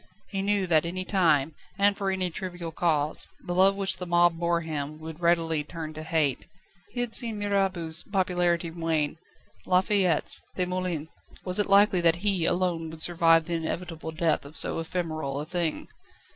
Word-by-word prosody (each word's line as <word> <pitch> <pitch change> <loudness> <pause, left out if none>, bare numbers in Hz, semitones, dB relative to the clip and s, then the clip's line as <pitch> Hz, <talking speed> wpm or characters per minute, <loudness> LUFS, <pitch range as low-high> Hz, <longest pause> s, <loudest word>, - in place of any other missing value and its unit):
He 195 -1 -2
knew 200 -1 +1
that 170 -3 +3
at 170 - -3
any 185 +1 -4
time, 160 -7 +2 0.2
and 200 0 +3
for 195 -1 -2
any 185 -2 -1
trivial 175 -1 -6
cause, 155 -2 +3
the 175 - -5
love 190 +2 +4
which 195 -1 0
the 180 - -6
mob 175 -1 +3
bore 170 0 0
him 155 -2 -5
would 160 0 -9
readily 165 -3 +1
turn 155 0 -7
to 155 - -8
hate. 155 -4 -1 0.4
He 245 +2 -3
had 240 -2 -3
seen 230 -4 +3
Mirabeau's 195 -5 -1
popularity 175 -3 0
wane, 160 -2 -2 0.5
La 180 0 +4
Fayette's, 185 -5 +2
Desmoulin's 180 -4 -3 0.4
was 180 +1 -1
it 205 - +2
likely 200 -2 +4
that 165 -1 +4
he 190 -5 +2
alone 175 -3 0
would 160 0 -4
survive 165 -2 +3
the 175 - -4
inevitable 165 0 -4
death 160 0 0
of 145 +3 -9
so - - +3
ephemeral 160 -4 -3
a 150 - -4
thing? 170 -1 -3
170 Hz, 175 wpm, -26 LUFS, 160-185 Hz, 0.5 s, love